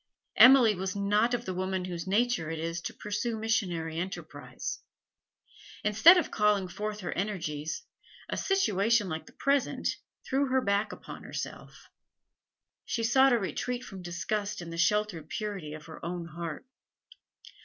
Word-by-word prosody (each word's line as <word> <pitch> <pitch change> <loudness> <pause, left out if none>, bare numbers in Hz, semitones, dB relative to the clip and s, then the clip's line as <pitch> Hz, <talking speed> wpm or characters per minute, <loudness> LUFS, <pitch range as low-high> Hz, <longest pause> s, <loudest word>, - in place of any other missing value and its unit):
Emily 250 -4 +8
was 190 +1 -3
not 210 +4 +2
of 240 0 -5
the 185 - -3
women 185 0 -2
whose 175 -1 -5
nature 215 -4 +1
it 165 - -3
is 165 +1 -3
to - - -4
pursue 210 +2 -3
missionary 175 -8 -1
enterprise; 190 +3 -5 1.0
instead 220 - +7
of 345 - 0
calling 210 -3 +2
forth 210 +3 -5
her 180 - -4
energies, 170 - -3 0.4
a - - -3
situation 230 - +2
like 160 -2 -5
the - - -13
present 275 -1 +1 0.4
threw 275 +1 +1
her 260 0 +2
back 200 -1 +1
upon - - -9
herself; - - -7 1.0
she 230 - -2
sought 265 +4 +5
a - - +5
retreat 245 +4 -3
from 195 -5 -9
disgust 200 +4 -3
in 170 -1 -7
the - - -5
sheltered 195 -5 +1
purity 200 -8 -4
of 155 0 -11
her 160 - -11
own 175 0 -4
heart. 165 - -6
200 Hz, 150 wpm, -29 LUFS, 175-230 Hz, 1.0 s, Emily